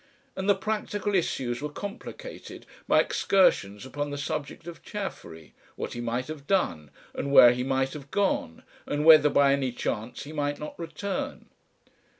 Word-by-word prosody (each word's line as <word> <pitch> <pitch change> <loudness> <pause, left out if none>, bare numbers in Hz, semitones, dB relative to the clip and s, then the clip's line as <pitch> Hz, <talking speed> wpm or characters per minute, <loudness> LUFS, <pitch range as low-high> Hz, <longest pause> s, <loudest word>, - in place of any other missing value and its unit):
And 190 +1 -2
the 200 - +6
practical 205 0 -2
issues 130 -9 -1
were 150 - -3
complicated 205 - -8 0.2
by - - +5
excursions 105 - +2
upon 145 +2 -4
the 145 - -5
subject 145 +2 -4
of 170 -1 -9
Chaffery, 135 - -7 0.2
what - - -5
he 120 - -5
might 120 +2 -2
have 150 -2 -8
done, 85 - 0 0.2
and 140 - -3
where 120 -3 +9
he 125 +1 -2
might 135 0 0
have 140 -3 -9
gone, 190 - -1 0.2
and 145 +1 -1
whether 155 -2 +8
by 140 -1 +4
any 135 -2 0
chance 115 0 -4
he 150 +2 -9
might 145 -1 -1
not 150 - -7
return. 200 - -5
145 Hz, 160 wpm, -27 LUFS, 130-190 Hz, 0.2 s, where